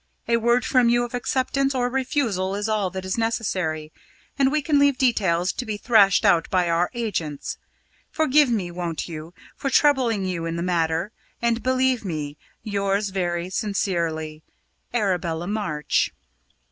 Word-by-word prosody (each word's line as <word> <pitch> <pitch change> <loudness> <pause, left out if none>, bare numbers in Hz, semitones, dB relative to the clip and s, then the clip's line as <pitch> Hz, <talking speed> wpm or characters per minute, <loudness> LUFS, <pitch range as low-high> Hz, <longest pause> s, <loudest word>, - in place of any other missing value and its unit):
A 235 - +3
word 235 +2 +2
from 250 -2 +3
you 240 0 +3
of 240 - -10
acceptance 265 +2 0
or 245 -1 +1
refusal 245 - -1
is 205 +2 -2
all 210 -3 0
that 190 +1 -6
is 190 +4 -2
necessary, 180 -9 -2 0.4
and 270 -1 +2
we 305 0 0
can 295 -1 +3
leave 280 -2 +4
details 190 -9 +2
to - - -4
be 215 -3 -4
thrashed 205 -4 +4
out 165 -1 +4
by 180 -2 +2
our 170 +1 +2
agents. 175 -11 -3 0.5
Forgive 300 -2 +3
me, 195 -7 -1
won't 170 -2 -4
you, 160 0 -8 0.2
for 275 - -2
troubling 255 -9 +3
you 170 -3 -2
in 165 - -3
the 170 - -2
matter, 170 +1 0 0.3
and 235 0 0
believe 260 -1 +1
me, 150 -6 -4 0.3
yours 200 0 0
very 175 -2 -2
sincerely. 170 -7 -2 0.5
"ARABELLA 180 -7 -1
MARCH." 195 -7 0
200 Hz, 155 wpm, -23 LUFS, 175-245 Hz, 0.5 s, leave